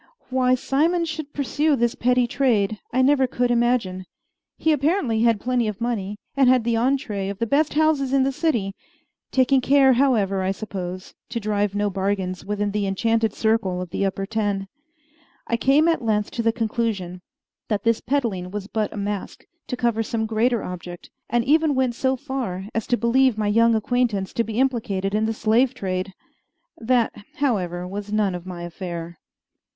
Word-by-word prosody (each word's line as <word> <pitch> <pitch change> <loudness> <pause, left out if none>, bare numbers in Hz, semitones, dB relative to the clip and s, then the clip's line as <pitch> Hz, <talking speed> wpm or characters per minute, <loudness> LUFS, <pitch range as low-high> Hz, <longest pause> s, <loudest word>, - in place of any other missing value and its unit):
Why 255 0 +3
Simon 325 +7 +1
should 310 -2 -5
pursue 290 +2 +1
this 240 -1 +1
petty 250 -1 +2
trade 220 -5 +1
I 260 +2 +2
never 270 -1 +4
could 245 0 0
imagine. 235 -6 +1 0.5
He 320 - +2
apparently 290 - +1
had 230 -2 +3
plenty 245 0 0
of 210 -1 -4
money, 210 -4 -2 0.2
and 270 -2 +4
had 255 -2 +4
the 235 0 0
entrée 230 -5 0
of 200 - -5
the 230 - -1
best 285 +5 +1
houses 305 -4 +2
in 270 -1 +3
the 270 - +1
city 260 - 0 0.6
taking 260 0 +3
care, 270 0 +5
however, 220 -7 +2
I 190 +1 0
suppose, 185 -3 -6 0.2
to 235 0 -3
drive 205 -2 -1
no 205 0 0
bargains 190 -1 -2
within 205 +1 -2
the 205 -1 -1
enchanted 225 +2 +1
circle 220 -5 +1
of 180 -2 -6
the - - -1
Upper 195 0 -1
Ten. 205 -2 -2 0.8
I 235 - 0
came 275 +7 +3
at 330 -4 +2
length 210 -3 0
to 235 - -2
the 230 0 +2
conclusion 220 -6 -2 0.5
that 210 -2 -1
this 230 -1 +2
peddling 230 -9 -1
was 205 0 -5
but 215 0 -2
a - - -8
mask 200 -1 -4 0.2
to 250 - -3
cover 235 -2 +1
some 225 0 -2
greater 225 +1 +1
object, 175 -1 -8 0.2
and 235 0 +1
even 310 0 +3
went 260 -2 +1
so 260 +2 0
far 255 -9 -4
as 225 - -2
to 245 - +2
believe 245 0 +3
my 215 - -1
young 230 +2 +4
acquaintance 220 -4 0
to 230 - +1
be 225 +1 -4
implicated 210 -7 0
in 215 +1 +1
the - - 0
slave 235 +4 +2
trade. 185 -4 -3 0.6
That, 240 0 +1 0.2
however, 180 -10 -1
was 205 +2 -6
none 210 -3 +1
of 180 0 -7
my 175 -2 -6
affair. 170 -1 -6
225 Hz, 180 wpm, -23 LUFS, 200-255 Hz, 0.8 s, care